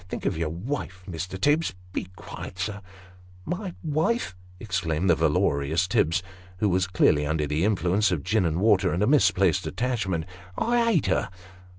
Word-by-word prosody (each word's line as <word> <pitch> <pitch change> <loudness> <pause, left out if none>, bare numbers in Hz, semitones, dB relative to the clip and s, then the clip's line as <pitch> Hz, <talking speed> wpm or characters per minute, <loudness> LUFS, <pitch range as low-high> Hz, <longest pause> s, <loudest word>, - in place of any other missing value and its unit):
Think - - -5
of - - +1
your 80 -1 -1
wife, 95 - -5
Mr. 90 +1 -5
Tibbs. 145 - +2 0.2
Be - - -2
quiet, 90 - -9
sir! 100 +1 -3 0.2
" 90 -1 -22
" 90 0 -23
My 185 -2 -6
wife! 160 - 0
" 90 0 -23
exclaimed 90 -4 0
the - - +5
valorous 75 +6 +1
Tibbs, 85 -1 +1 0.3
who 105 +2 +1
was 95 +1 +1
clearly 85 -5 +3
under 80 0 0
the 75 +3 -1
influence 100 0 +2
of 80 -6 -1
gin 105 +2 +2
and 80 +1 -1
water, 95 -3 +3
and 90 +4 +1
a - - +4
misplaced 100 - +3
attachment; 100 -10 -1 0.2
" 90 - -21
I 235 0 +2
ate 165 - +2
her - - +1
95 Hz, 185 wpm, -26 LUFS, 85-110 Hz, 0.3 s, the